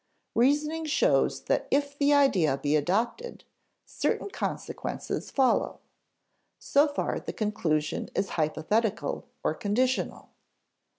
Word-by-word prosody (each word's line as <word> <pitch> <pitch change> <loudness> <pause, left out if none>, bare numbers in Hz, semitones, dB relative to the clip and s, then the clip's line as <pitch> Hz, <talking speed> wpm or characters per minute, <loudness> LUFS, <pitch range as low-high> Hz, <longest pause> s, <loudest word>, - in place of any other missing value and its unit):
Reasoning 300 +6 +2
shows 305 - +2
that - - 0
if 285 0 +1
the 285 0 +2
idea 200 - +4
be 145 +2 0
adopted, 225 - -1 0.4
certain 405 - -2
consequences - - -4
follow. 265 -2 +1 0.8
So 285 +2 +3
far 290 - -2
the - - -6
conclusion 160 -8 -1
is 195 - 0
hypothetical 190 +8 -1 0.2
or - - +1
conditional. 250 +6 -1
235 Hz, 105 wpm, -28 LUFS, 175-285 Hz, 0.8 s, idea